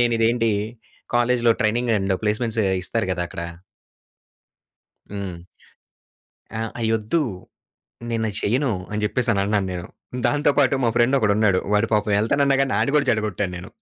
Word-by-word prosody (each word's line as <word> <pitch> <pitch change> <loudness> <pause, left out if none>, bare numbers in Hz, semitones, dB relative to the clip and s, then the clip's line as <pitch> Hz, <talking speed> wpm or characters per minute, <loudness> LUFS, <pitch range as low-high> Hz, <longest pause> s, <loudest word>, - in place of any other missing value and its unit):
నేను 120 -1 +3
ఇదేంటి 115 0 +2 0.7
కాలేజ్‌లో 120 -1 +3
ట్రైనింగ్ 115 +2 +1
అండ్ 95 -1 0
ప్లేస్మెంట్సే 110 0 0 0.2
ఇస్తారు 110 +2 0
కదక్కడ. 85 -2 -4 1.7
హ్మ్. 95 -4 -6 1.2
ఆ! - - -2 0.2
అయొద్దు. 110 +7 +1 0.9
నేనది 110 -3 -1
చేయను 125 +5 +1 0.2
అని 105 - -2
చెప్పేసన్నాను 105 -3 +1
నేను. 90 -1 -5 0.4
దాంతో 145 +3 +2
పాటు 135 -2 +4
మా 115 - +3
ఫ్రెండొకడున్నాడు. 110 -6 +3
వాడు 105 +2 +3
పాపం 105 0 +1
ఎళ్తానన్నాగానీ 135 +1 +2
ఆడిని 115 +7 +1
కూడా 140 -2 +2
చెడగొట్టాను 105 -4 -1
నేను. 85 - -8
110 Hz, 115 wpm, -22 LUFS, 105-120 Hz, 1.7 s, పాటు